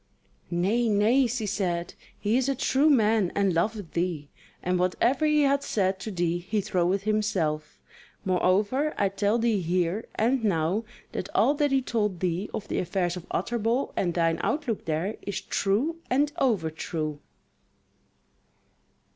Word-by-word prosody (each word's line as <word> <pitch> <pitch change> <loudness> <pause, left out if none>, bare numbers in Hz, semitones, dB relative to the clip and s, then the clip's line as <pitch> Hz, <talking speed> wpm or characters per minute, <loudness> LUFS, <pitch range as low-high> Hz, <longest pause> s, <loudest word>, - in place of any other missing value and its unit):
"Nay, 205 +7 +1
nay," 225 +6 +4
she 230 -1 -2
said, 175 -4 -2 0.2
"he 210 +2 0
is 260 +1 +2
a 275 - +1
true 275 +3 +3
man 220 - +3
and 200 -2 +2
loveth 200 +2 -1
thee, 170 -4 -2 0.3
and 180 0 0
whatever 235 - +2
he 300 -1 +4
hath 280 0 +3
said 190 -6 0
to 205 - -5
thee 175 -3 -1
he 190 +5 -2
troweth 185 -1 0
himself. 190 -8 -1 0.5
Moreover, 200 - +1
I 200 - +2
tell 200 +3 +1
thee 225 -4 +1
here 180 +4 0
and 240 +2 +1
now 190 +2 +1 0.3
that 190 - -4
all 235 +8 +4
that 295 0 +1
he 270 -1 +2
told 210 -7 -1
thee 180 +3 -1
of 210 - -5
the - - -1
affairs 180 0 -1
of 180 -1 -8
Utterbol, 235 +3 -1
and 175 -3 0
thine 165 -1 +1
outlook 285 -8 -1
there, 165 +6 -2
is 200 -2 -3
true 235 +17 0
and 285 +3 +2
overtrue." 160 - -1
200 Hz, 150 wpm, -27 LUFS, 175-235 Hz, 0.5 s, nay